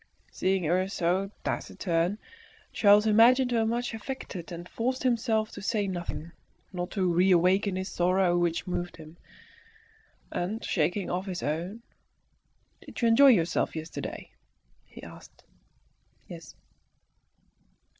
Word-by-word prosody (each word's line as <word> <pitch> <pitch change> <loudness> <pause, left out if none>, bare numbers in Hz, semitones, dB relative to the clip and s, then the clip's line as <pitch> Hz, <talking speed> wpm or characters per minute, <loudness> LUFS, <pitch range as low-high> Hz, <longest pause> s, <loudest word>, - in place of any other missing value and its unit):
Seeing 190 -1 0
her 180 +4 +1
so 190 +1 -1
taciturn, 175 +2 -1 0.6
Charles 205 0 +5
imagined 245 +4 +5
her 225 -2 +1
much 240 +1 -2
affected, 220 -7 -7
and 175 +1 -7
forced 255 +6 -2
himself 225 -3 +1
to 205 - -9
say 205 +1 0
nothing, 175 -3 -5 0.4
not 180 -1 -4
to 190 -3 0
reawaken 185 +2 +3
this 185 +1 -4
sorrow 180 0 +2
which 175 0 0
moved 175 -1 -4
him. 160 0 -12 1.2
And, 205 +6 -3
shaking 180 +3 0
off 185 +2 -3
his 185 -1 -4
own 175 +10 -3 1.0
"Did - - -10
you 235 - +3
enjoy 275 +5 +7
yourself 180 -11 +2
yesterday?" 160 0 -6 0.5
he - - -14
asked. - - -14 0.8
"Yes." - - -11
190 Hz, 120 wpm, -28 LUFS, 175-220 Hz, 1.2 s, enjoy